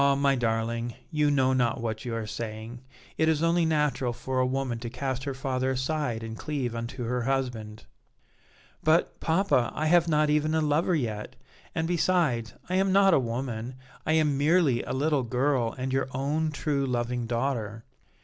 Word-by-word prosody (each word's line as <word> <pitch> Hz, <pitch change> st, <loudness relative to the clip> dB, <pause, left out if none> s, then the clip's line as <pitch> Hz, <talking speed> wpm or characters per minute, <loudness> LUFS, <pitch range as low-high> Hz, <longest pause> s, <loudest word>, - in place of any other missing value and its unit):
my 140 Hz, 0 st, +3 dB
darling, 115 Hz, -1 st, -1 dB, 0.2 s
you 150 Hz, -2 st, +2 dB
know 130 Hz, -2 st, +3 dB
not 125 Hz, 0 st, +1 dB
what 110 Hz, -1 st, -4 dB
you 120 Hz, -2 st, -3 dB
are 115 Hz, -1 st, -3 dB
saying; 110 Hz, +2 st, -6 dB, 0.4 s
it 160 Hz, -, +4 dB
is 160 Hz, 0 st, +1 dB
only 165 Hz, 0 st, +3 dB
natural 150 Hz, -5 st, +1 dB
for 130 Hz, +2 st, -3 dB
a 130 Hz, -, +3 dB
woman 130 Hz, -3 st, -2 dB
to 120 Hz, 0 st, -5 dB
cast 130 Hz, +1 st, -3 dB
her 140 Hz, -, -2 dB
father 130 Hz, 0 st, -1 dB
aside 130 Hz, -3 st, -1 dB
and 115 Hz, 0 st, -6 dB
cleave 140 Hz, -6 st, -2 dB
unto 115 Hz, +2 st, -5 dB
her 125 Hz, +1 st, -1 dB
husband." 120 Hz, -5 st, -2 dB, 1.0 s
"But, 160 Hz, +3 st, +2 dB
papa, 160 Hz, -7 st, +2 dB
I 155 Hz, -, -1 dB
have 170 Hz, +1 st, +4 dB
not 155 Hz, -1 st, +3 dB
even 155 Hz, +1 st, +2 dB
a 160 Hz, -, +2 dB
lover 155 Hz, +4 st, +2 dB
yet, 110 Hz, -7 st, -3 dB, 0.4 s
and, 160 Hz, 0 st, 0 dB
besides, 165 Hz, -10 st, +1 dB
I 185 Hz, -, 0 dB
am 190 Hz, 0 st, +2 dB
not 195 Hz, -1 st, +5 dB
a -, -, +5 dB
woman; 120 Hz, 0 st, -3 dB, 0.3 s
I 155 Hz, -, +1 dB
am 150 Hz, -3 st, +2 dB
merely 150 Hz, -4 st, +3 dB
a -, -, -6 dB
little 145 Hz, +1 st, +1 dB
girl 125 Hz, -1 st, 0 dB
and 130 Hz, 0 st, -3 dB
your 135 Hz, 0 st, +1 dB
own, 150 Hz, +4 st, 0 dB
true, 145 Hz, -2 st, -1 dB
loving 120 Hz, -1 st, -1 dB
daughter." 115 Hz, -3 st, -2 dB
130 Hz, 180 wpm, -27 LUFS, 120-155 Hz, 1.0 s, not